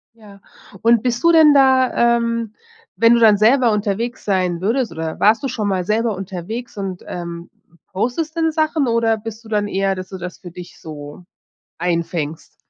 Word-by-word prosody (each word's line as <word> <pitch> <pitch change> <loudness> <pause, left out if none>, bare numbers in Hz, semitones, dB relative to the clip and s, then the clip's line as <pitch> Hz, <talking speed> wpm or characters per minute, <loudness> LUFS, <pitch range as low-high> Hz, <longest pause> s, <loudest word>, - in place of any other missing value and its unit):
Ja, 205 -3 -16 0.4
und 230 0 +3
bist 240 +1 -1
du 335 - +6
denn 315 -3 +6
da, 260 -3 +4
ähm, 230 -2 -2 0.4
wenn 230 0 +5
du 235 - +3
dann 215 -3 +6
selber 235 +2 +4
unterwegs 215 +3 -2
sein 185 -4 0
würdest 230 +5 0
oder 160 -1 -5
warst 215 +3 +4
du 275 - -2
schon 220 -5 -3
mal 185 -2 -1
selber 220 +1 0
unterwegs 195 +5 -7
und, 190 -2 -5
ähm, 170 -1 -7 0.4
postest 250 - -3
denn 325 -1 +1
Sachen 310 -3 0
oder 230 -1 +1
bist 225 +1 -9
du 220 - -14
dann 205 -1 0
eher, 195 0 0
dass 185 0 -8
du 190 - -7
das 180 0 -7
für 175 -3 -11
dich 180 0 -11
so 150 +2 -10 0.6
einfängst? 165 -2 -3
215 Hz, 180 wpm, -19 LUFS, 185-235 Hz, 0.6 s, du